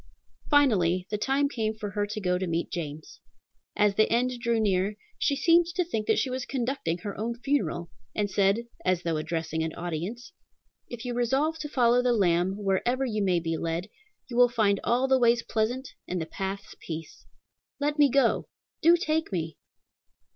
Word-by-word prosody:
Finally 185 - +3
the - - 0
time 275 +4 +2
came 220 -5 -2
for 210 -2 -5
her 205 0 -1
to 215 +1 -4
go 180 -2 0
to 185 - -2
meet 170 0 -2
James. 155 -3 -6 0.6
As 210 -1 +3
the 215 +2 +2
end 245 +2 +2
drew 235 -1 +1
near, 200 -1 +1 0.2
she 280 - +2
seemed 335 +3 +4
to 360 -1 +1
think 220 -11 -3
that - - +3
she 260 - 0
was 255 0 -2
conducting 250 -11 -2
her 205 -2 -4
own 235 +2 -2
funeral, 275 -11 -1 0.2
and 210 -1 +1
said, 200 +3 +2 0.2
as 185 -1 +1
though 165 -2 0
addressing 160 +1 -2
an 160 0 -3
audience, 175 - -5 0.6
"If 240 0 -7
you 245 - -2
resolve 270 +7 +1
to 300 -1 -5
follow 245 -3 +3
the 250 -1 +2
Lamb 180 -3 +2
wherever 210 +6 0
you 215 -4 -1
may 180 -3 +2
be 165 -1 -2
led, 165 +5 -3 0.4
you 240 - -7
will 245 0 +7
find 215 -4 +2
all 250 +3 +2
the 265 0 +4
ways 235 -1 +3
pleasant 245 +4 -1 0.2
and 180 - -2
the 160 - -2
paths 195 +4 -5
peace. 160 -1 -8 0.5
Let 295 +1 -1
me 290 -1 +6
go! 275 +1 +2 0.3
Do 340 +1 +6
take 320 - -1
me!" 160 -4 -3
215 Hz, 185 wpm, -27 LUFS, 180-255 Hz, 0.6 s, will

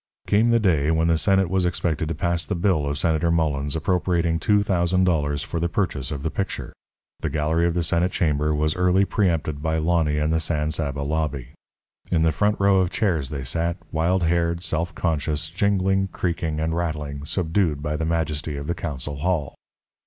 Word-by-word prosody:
Came 110 +3 +3
the 115 - +4
day 80 -8 +2
when 80 +1 +2
the 80 - +3
Senate 95 +2 +3
was 95 +1 0
expected 85 -3 -1
to 80 - -2
pass 85 0 0
the - - -3
bill 85 -5 +1
of 70 0 -2
Senator 80 +1 +1
Mullens 75 -3 0
appropriating 85 0 0
two 105 +3 +3
thousand 90 -1 +1
dollars 75 -5 +1
for 85 - -4
the 85 +1 0
purchase 80 -9 -1
of 70 -1 -5
the 80 - -1
picture. 100 - -4 0.5
The 80 - -2
gallery 80 +3 +1
of 85 - -1
the 85 - +1
Senate 85 +2 +1
chamber 75 -3 +1
was 75 +1 +1
early 90 +2 +3
preempted 80 -8 0
by 80 +1 0
Lonny 80 -2 +1
and 75 +1 +1
the 80 - +2
San 75 -1 -1
Saba 70 -2 -3
lobby. 70 -4 -2 0.6
In 80 -3 +2
the 80 - +3
front 105 +7 +1
row 100 -1 +4
of 90 -2 +2
chairs 85 - 0
they 70 -3 -4
sat, 85 +6 -1
wild 85 +3 +1
haired, 85 +1 +1
self 85 +1 -1
conscious, 80 -1 -1
jingling, 95 +1 +1
creaking, 85 -4 -2
and 80 +1 -1
rattling, 75 -4 -3
subdued 80 -2 0
by 75 0 -2
the 80 - -2
majesty 80 -2 -1
of 70 - -5
the 85 - -1
council 75 -4 -4
hall. 75 -2 -1
80 Hz, 195 wpm, -23 LUFS, 75-90 Hz, 0.6 s, the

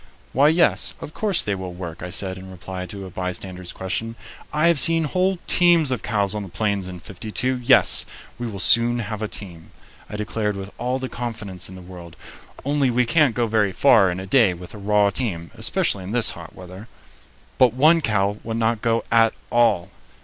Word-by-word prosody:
"Why, 140 +3 +4
yes, 165 +2 +2
of 150 - -9
course 205 -5 +1
they 105 - -1
will 95 -2 -6
work," 85 -2 -8
I 90 - -6
said, 95 +1 -3
in 95 0 -11
reply 95 0 -7
to 100 +1 -8
a 95 - -10
bystander's 90 -1 -5
question. 115 +5 -4 0.4
"I 155 +2 +2
have 170 -4 +4
seen 165 +3 +6
whole 185 +5 0
teams 170 -5 +4
of 125 - -2
cows 100 -3 -1
on 105 - -4
the 100 - -8
Plains 100 0 -2
in 90 -1 -8
'52. 110 +8 -3
Yes, 120 - +4 0.4
we 120 - -3
will 105 -3 -6
soon 115 +5 +3
have 110 -2 -5
a 110 - -2
team," 90 -5 -7 0.4
I - - -7
declared 105 0 -2
with 100 +1 -8
all 125 +2 -1
the 130 0 -4
confidence 110 -8 -4
in 95 - -11
the 90 - -11
world, 90 -2 -12 0.5
"only 140 -1 +1
we 125 +1 +1
can't 145 -2 +2
go 120 - +1
very 105 -3 +1
far 110 -3 +4
in 90 +1 -4
a 95 - -6
day 100 -3 +3
with 90 +1 -11
a 105 - -10
raw 105 0 +2
team, 85 - -3
especially 95 - +1
in 95 +4 -6
this 120 -2 +3
hot - - -11
weather." 95 +4 -11 0.7
But 125 -2 +4
one 160 +5 +4
cow 105 -4 0
would 115 0 -4
not 115 -1 0
go 115 0 0
at 115 -1 +4 0.2
all! 115 -7 +2
105 Hz, 205 wpm, -22 LUFS, 95-125 Hz, 0.7 s, seen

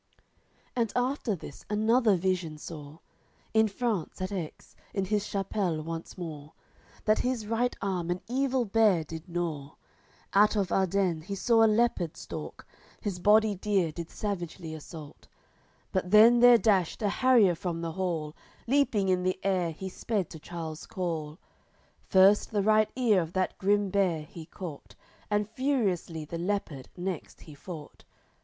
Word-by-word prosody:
LVII - - -37 0.6
And 230 -3 0
after 250 -3 0
this 150 -4 -11
another 220 +1 +3
vision 175 -3 -1
saw, 150 -1 -9 0.6
In 220 0 +5
France, 210 -5 -2
at 185 +1 -3
Aix, 175 -6 -6 0.2
in 195 -1 0
his 210 +1 -1
Chapelle 195 -5 -1
once 165 +2 -6
more, 155 -4 -7 0.5
That 215 0 +3
his 250 -4 -1
right 230 +3 0
arm 180 -3 -2
an 175 +1 -1
evil 260 0 +1
bear 205 -5 +3
did 160 +3 -9
gnaw; 160 -4 -3 0.6
Out 210 +2 +5
of 195 -4 0
Ardennes 185 -4 +1
he 200 +1 -4
saw 225 +3 +4
a - - +6
leopard 215 -7 +1
stalk, - - -8 0.3
His 195 -4 -4
body 210 +3 +4
dear 195 -3 0
did 170 +1 -7
savagely 175 -5 -5
assault; 155 -1 -10 0.6
But 185 -2 -1
then 225 +4 +7
there 245 0 +8
dashed 205 -4 +1
a 205 - +2
harrier 240 -6 +4
from 170 0 -4
the 165 -1 -3
hall, 165 -4 -3 0.3
Leaping 240 -6 +2
in 185 -1 +2
the 185 0 -1
air 185 -3 +1
he 165 +4 -6
sped 195 0 -2
to 160 - -9
Charles 160 -1 -7
call, 165 -7 -4 0.7
First 195 +2 +5
the 205 -2 0
right 215 +1 +4
ear 230 -7 +3
of 165 +1 -6
that 185 0 0
grim 200 0 +2
bear 180 -6 +1
he 160 +1 -11
caught, 175 -7 -9 0.3
And 210 -1 +1
furiously 205 - -1
the 165 +2 -6
leopard 170 -8 -3
next 180 -2 -5
he 155 - -12
fought. 155 0 -10
190 Hz, 155 wpm, -29 LUFS, 165-215 Hz, 0.7 s, there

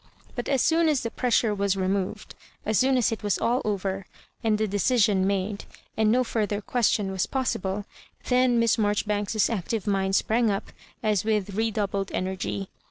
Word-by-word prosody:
But 245 - -4
as 270 -3 +2
soon 325 0 +3
as 290 -4 +1
the 230 - -3
pressure 235 -3 +1
was 200 -1 0
removed— 195 +2 -2 0.3
as 215 -1 +2
soon 260 0 +3
as 240 -3 +2
it 225 - -4
was 205 -2 0
all 240 +3 +1
over, 195 -2 -2 0.4
and 220 -2 +2
the 215 0 0
decision 205 -1 +2
made, 200 +1 -2 0.3
and 215 -1 +3
no 255 +2 +3
fur 225 -3 -1
ther 205 0 -2
question 210 -3 +1
was 190 -2 -1
possible, 205 -6 -2 0.4
then 250 -1 +3
Miss 230 0 +3
Maijori 205 -1 +1
banks's 210 0 +1
active 220 0 -2
mind 195 -2 +1
sprang 230 +2 +2
up 195 -1 -3 0.3
as 210 -2 +1
with 210 -2 0
redoubled 200 -2 -1
energy. 190 +1 -3
210 Hz, 175 wpm, -26 LUFS, 195-230 Hz, 0.4 s, soon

